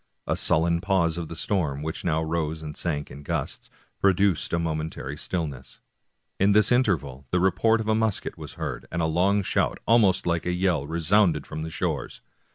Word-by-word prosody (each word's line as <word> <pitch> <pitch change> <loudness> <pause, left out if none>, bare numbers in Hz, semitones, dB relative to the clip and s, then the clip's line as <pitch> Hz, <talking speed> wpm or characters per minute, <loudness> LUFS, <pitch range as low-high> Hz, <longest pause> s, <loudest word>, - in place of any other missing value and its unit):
A - - 0
sullen 85 +1 +2
pause 95 -4 +1
of 85 -2 -4
the 85 - -7
storm, 75 -7 -1
which 80 +1 -4
now 80 -1 +1
rose 80 -1 -2
and 75 -1 -6
sank 75 -4 -3
in 70 - -9
gusts, 70 - -4 0.3
produced 95 -4 +2
a 85 - +1
momentary 80 -4 -3
stillness. 75 -5 -5 0.6
In 100 +1 +4
this 105 +1 +4
interval 75 - +1
the 90 - +1
report 110 +5 +3
of 110 - -4
a 110 - +3
musket 110 -2 0
was - - -9
heard, - - -5
and 85 - -1
a - - +2
long 95 +5 +2
shout, - - 0
almost 110 -5 +4
like 85 0 0
a 90 - +1
yell, 90 -6 0
resounded 85 0 +2
from 80 0 -6
the 80 - -4
shores. - - -3
85 Hz, 185 wpm, -25 LUFS, 80-95 Hz, 0.6 s, In